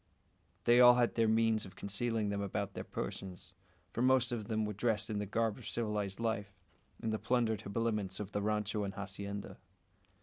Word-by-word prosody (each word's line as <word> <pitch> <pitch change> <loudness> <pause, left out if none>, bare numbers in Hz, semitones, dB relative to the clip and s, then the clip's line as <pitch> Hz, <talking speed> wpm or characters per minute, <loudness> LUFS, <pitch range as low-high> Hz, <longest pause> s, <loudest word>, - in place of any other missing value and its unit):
They 120 +1 +6
all 125 0 +9
had 120 -1 +2
the 115 -1 +2
means 110 0 +3
of 95 - -10
concealing 110 +1 -1
them 100 0 -1
about 100 0 -2
their - - -5
persons; 95 -2 -6 0.4
for 115 - -2
most 130 -1 +4
of 110 -4 -3
them 110 -1 0
were 105 - -3
dressed 110 +1 0
in 105 - -1
the 105 - -3
garb 110 +1 0
of - - -7
civilised 105 -4 -2
life, 105 -4 -2 0.5
in 110 - 0
the 110 - -1
plundered 115 -2 +1
habiliments 105 -2 -1
of 105 -1 -5
the 105 - -1
rancho 105 0 0
and 95 -1 -4
hacienda. 100 +1 -5
105 Hz, 190 wpm, -34 LUFS, 100-115 Hz, 0.5 s, all